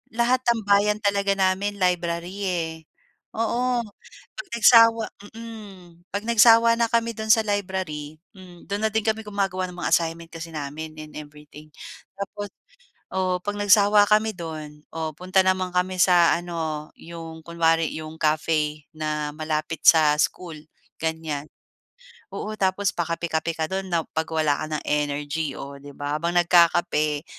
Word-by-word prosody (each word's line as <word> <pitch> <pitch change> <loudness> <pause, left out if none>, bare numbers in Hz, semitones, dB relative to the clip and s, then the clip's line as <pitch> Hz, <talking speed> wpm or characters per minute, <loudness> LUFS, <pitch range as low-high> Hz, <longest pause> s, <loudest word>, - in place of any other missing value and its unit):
lahat 240 +2 +2
tambayan 210 -2 +3
talaga 200 -1 +1
namin 195 +1 0
library, 175 0 -1
eh, 170 -3 -1 0.6
oo. 245 +2 0 0.6
'Pag - - -8
nagsawa 230 0 +6 0.3
mm. 195 -7 -12
'Pag 200 +1 -3
nagsawa 230 0 +6
na 230 0 +2
kami 230 0 +1
do'n 220 0 0
sa 225 - +3
library, 180 -7 -3 0.2
hmm, 180 -2 -14
do'n 205 +1 -3
na 220 - +1
din 220 -1 0
kami 220 0 0
gumagawa 195 -3 -2
ng 180 - -12
mga - - -2
assignment 165 0 0
kasi 165 0 -8
namin 155 +1 -6
and 155 0 -10
everything. 150 0 -12 0.5
Tapos, 205 +1 -5 0.6
oh, 185 -1 0
'pag 205 0 -3
nagsawa 205 0 +5
kami 215 +1 +3
do'n, 155 -4 -8
oh, 160 -1 -3
punta 185 +2 +2
naman 185 -1 0
kami 185 +1 0
sa 175 -1 +5
ano, 160 -3 -4
'yong 165 -1 -9
kunwari 165 -1 +1
'yong 155 0 -7
cafe 155 -1 0
na 150 -1 -3
malapit 155 0 -3
sa 155 -2 +7
school, 165 +1 -2 0.4
ganyan. 160 -3 -3 0.9
Oo, 215 - -4
tapos 195 +1 +1
pakape-kape 165 -1 -2
ka 160 - -1
do'n 190 0 -3
na 170 -1 +1
'pag 160 0 -1
wala 155 -3 +1
ka - - -3
ng - - -9
energy, 145 0 -1
oh, 140 0 -8
'di 145 +1 -11
ba? 145 +1 -2
Habang 170 +1 -1
nagkakape, 170 -3 +3
175 Hz, 145 wpm, -24 LUFS, 155-200 Hz, 0.9 s, sa